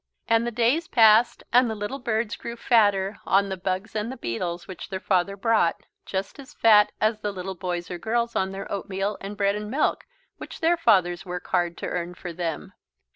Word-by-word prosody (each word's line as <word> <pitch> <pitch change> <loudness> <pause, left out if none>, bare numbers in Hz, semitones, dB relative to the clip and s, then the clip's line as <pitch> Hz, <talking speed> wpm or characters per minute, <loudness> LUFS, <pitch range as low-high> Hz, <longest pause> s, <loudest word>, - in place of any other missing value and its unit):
And 230 +1 +2
the - - -2
days 245 +8 +1
passed 225 0 +5
and 250 0 +5
the 220 - -3
little 210 +6 -4
birds 230 -2 -1
grew 235 - -7
fatter 205 -4 +2
on 195 +1 +2
the 190 - -2
bugs 190 +3 -3
and 215 +3 -2
the 265 - -7
beetles 170 +9 -4
which 185 - -8
their 190 -1 -4
father 190 +1 0
brought, 215 -5 +1 0.2
just 195 +8 -4
as 270 - -12
fat 210 -2 +5
as 215 0 +1
the 210 -1 -3
little 190 0 -5
boys 175 -1 -4
or 175 - -5
girls 235 +3 -1
on 190 0 0
their 195 0 -6
oatmeal 195 +1 -2
and 200 +1 -7
bread 200 -1 +2
and 210 0 -5
milk, 275 +6 0 0.3
which - - -9
their 335 +1 +3
fathers 185 - +2
work 180 -1 -6
hard 175 -2 0
to - - -5
earn 180 0 -4
for 175 -1 -7
them. 165 -1 -4
200 Hz, 205 wpm, -25 LUFS, 185-230 Hz, 0.3 s, passed